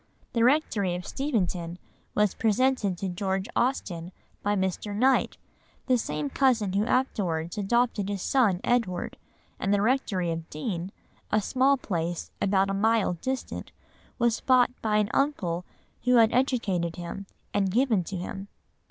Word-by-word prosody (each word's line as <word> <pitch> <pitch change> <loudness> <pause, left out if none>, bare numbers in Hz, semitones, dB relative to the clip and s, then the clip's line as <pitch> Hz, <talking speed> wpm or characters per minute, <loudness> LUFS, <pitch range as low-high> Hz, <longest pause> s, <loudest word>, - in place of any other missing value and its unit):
The 230 -1 +2
rectory 235 - +2
of 180 0 -6
Steventon 180 - -2 0.4
was 210 -2 +3
presented 225 -3 +1
to 195 - -3
George 190 +2 -2
Austen 180 -9 -1 0.3
by 205 0 +1
Mr. 190 +2 -2
Knight, 260 +5 +2 0.5
the 255 - +3
same 150 -10 -2
cousin 225 - +2
who 205 +3 +1
afterwards 175 -11 0
adopted 210 -1 +1
his 200 -2 -3
son 210 -9 +2
Edward; 225 -8 0 0.4
and 195 - 0
the 205 - +3
rectory 205 -6 +1
of 165 0 -5
Deane, 175 +3 -4 0.4
a 215 - +4
small 265 +6 +2
place 175 -7 -3
about 195 0 +2
a - - -1
mile 215 -1 +2
distant, 260 0 -4 0.5
was 235 -2 +1
bought 250 -1 +4
by 215 -1 +1
an 210 -1 +1
uncle 180 - 0 0.4
who 250 0 +5
had 225 -2 +5
educated 210 -10 +1
him, 180 +3 -7 0.3
and 200 -1 +2
given 225 -2 +2
to 195 - -5
him. 195 +2 -6
205 Hz, 145 wpm, -27 LUFS, 180-245 Hz, 0.5 s, who